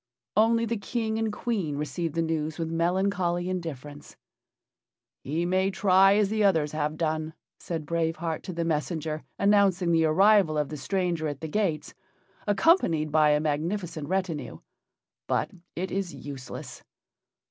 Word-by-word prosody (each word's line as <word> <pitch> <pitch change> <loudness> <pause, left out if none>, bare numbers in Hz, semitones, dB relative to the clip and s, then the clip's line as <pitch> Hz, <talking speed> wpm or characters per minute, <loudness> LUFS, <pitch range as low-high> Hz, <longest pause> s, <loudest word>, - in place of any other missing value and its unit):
Only 230 +2 +4
the 230 0 -2
King 220 +1 -2
and 225 -1 0
Queen 200 -10 -2
received 160 +2 -3
the 165 - +1
news 160 -1 -2
with 165 -1 -3
melancholy 175 +1 0
indifference. 145 -5 -6 1.1
"He 160 +5 -1
may 185 +2 +2
try 195 +1 +5
as 205 -2 +2
the 215 0 +1
others 160 -7 +3
have 155 0 -2
done," 155 0 -2 0.2
said 165 -3 -4
Brave 165 +1 0
Heart 160 0 -3
to 185 - -5
the 170 0 -2
messenger 155 -1 -2 0.2
announcing 200 -3 +3
the 165 -1 +4
arrival 190 0 +4
of 150 -2 0
the 155 - -5
stranger 175 0 -1
at 145 -2 -4
the 160 - -4
gates, 170 -2 -1 0.5
accompanied 200 - +3
by 155 0 +4
a 150 0 +4
magnificent 155 +1 -2
retinue; 165 - -2 0.7
"but - - 0 0.2
it 185 +3 -3
is 190 -3 -3
useless." 135 -3 -8
170 Hz, 145 wpm, -27 LUFS, 155-195 Hz, 1.1 s, try